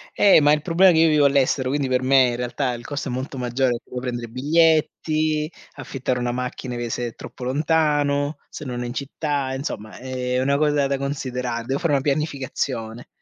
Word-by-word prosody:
Eh, 200 -6 +6
ma 145 0 +5
il 150 - +1
problema 185 +2 +5
è - - +2
che 160 - +5
io 165 - +5
vivo 150 -2 +4
all'estero. 135 -1 +2
Quindi 140 0 0
per 130 0 +1
me 130 -1 +5
in 120 - -2
realtà 125 +1 -2
il 120 0 -8
costo 145 -1 -4
è - - -3
molto 130 +2 -4
maggiore 125 +1 0
perché 120 - -6
devo 125 - -4
prendere 120 -2 -4
i - - -16
biglietti, 155 +2 +1 0.2
affittare 130 -2 -3
una 120 0 -1
macchina 125 0 -4
che 120 -1 -3
se 120 +1 -2
è 115 - -9
troppo - - -10
lontano, 145 +1 +1
se - - -8
non 125 -2 -4
è - - -4
in 120 - -5
città. 140 0 -2
Insomma, 110 -5 -5
è 125 0 -2
una 140 +2 +2
cosa 145 -2 +2
da 140 0 0
considerare. 125 -4 -3
Devo 135 +3 -1
fare 170 -4 +1
una 140 - +2
pianificazione. 135 -5 -3
135 Hz, 215 wpm, -22 LUFS, 125-150 Hz, 0.2 s, Eh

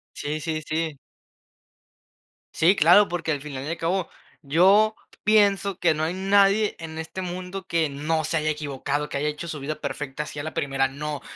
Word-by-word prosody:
Sí, 150 +1 -3
sí, 155 0 -2
sí. 155 -1 -2 1.6
Sí, 175 +5 +4
claro, 180 +6 +6
porque 165 -2 -2
al 145 - -3
final 140 -3 -6
y - - -5
al 165 - -2
cabo, 175 +2 -1 0.3
yo 195 +9 +4 0.3
pienso 200 -3 +3
que 170 - +3
no 155 0 -1
hay 165 +3 -2
nadie 200 +2 +3
en 160 -1 -8
este 160 +3 -6
mundo 185 +1 -6
que 165 -3 0
no 155 +3 -1
se 165 +2 0
haya 155 0 -1
equivocado, 145 -1 -3
que - - -2
haya 150 +2 0
hecho 150 +3 -5
su 155 -3 -5
vida 145 +3 -3
perfecta 145 -1 -4
así 150 - -8
a - - -2
la 155 +1 -6
primera, 135 -1 0
no. 145 +1 -5
160 Hz, 190 wpm, -24 LUFS, 150-185 Hz, 1.6 s, claro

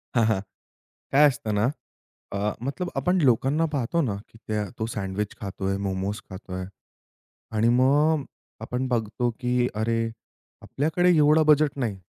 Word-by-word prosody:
हां. 115 -2 +4
हां. 105 -4 +2 0.7
काय 145 +2 +6
असत 120 -4 -4
ना, 105 - +2 0.7
अ, 100 - -1 0.3
मतलब 175 +6 -3
आपण 180 +8 +2
लोकांना 135 +5 +3
पाहतो 140 +5 0
ना 115 -10 -1 0.3
त्या 105 -1 -1
तो 110 - 0
सँडविच 100 0 -3
खातोय, 95 0 -2
मोमोस 100 +1 -2
खातोय 95 -1 -6 0.9
आणि 115 +2 +3
मग 145 +3 +3 0.4
आपण 125 +3 -2
बघतो 120 0 0
की 125 -1 +1
अरे, 115 +2 0 0.6
आपल्याकडे 160 +5 +1
एवढा 150 +1 +5
बजेट 150 -1 +4
नाही. 115 -7 -2
120 Hz, 135 wpm, -25 LUFS, 105-145 Hz, 0.9 s, काय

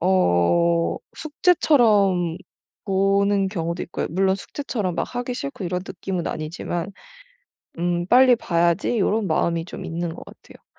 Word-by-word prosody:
어 170 - +2 0.2
숙제처럼 215 - +2 0.5
보는 195 0 +2
경우도 170 -2 -3
있고요, - - -4
물론 190 +3 +2
숙제처럼 200 - -4
막 - - 0
하기 245 0 -3
싫고 140 - -6
이런 180 +1 -2
느낌은 185 -1 -4
아니지만. 165 +3 -4 0.9
음 175 0 -1
'빨리 250 +2 +6
봐야지.' 170 +3 +1
요런 215 +1 +1
마음이 165 0 0
좀 - - -8
있는 170 0 -4
것 - - -10
같아요. - - -17
185 Hz, 285 characters per minute, -22 LUFS, 170-205 Hz, 0.9 s, 빨리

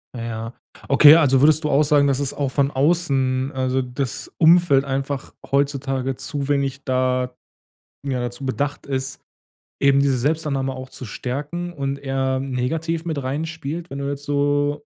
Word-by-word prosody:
Na 115 - -5
ja. 115 0 -5 0.3
Okay, 145 +2 +8
also 135 -5 +4
würdest 155 +2 +4
du 150 - 0
auch 145 +2 +4
sagen, 145 -1 +3
dass 135 -1 +1
es 140 -2 -2
auch 140 -2 -1
von 140 +1 +1
außen, 135 -3 +1
also 130 0 0
das 125 0 -4
Umfeld 165 -4 +5
einfach 135 0 -3 0.2
heutzutage 135 -1 0
zu 145 0 -4
wenig 140 -1 -1
da 130 -1 0 0.7
ja, 130 -2 -1
dazu 120 +2 -5
bedacht 145 +2 -2
ist, 135 -1 -4 0.6
eben 140 0 +5
diese 140 -2 +2
Selbstannahme 140 -1 -1
auch 130 0 -8
zu 130 - -8
stärken 145 +10 -5
und 140 -3 -3
eher 135 -1 -1
negativ 155 +6 -2
mit 155 -4 -2
reinspielt, 160 +4 -4
wenn 140 - -6
du 140 0 -2
jetzt 140 0 -5
so 145 0 0
140 Hz, 160 wpm, -22 LUFS, 130-145 Hz, 0.7 s, Okay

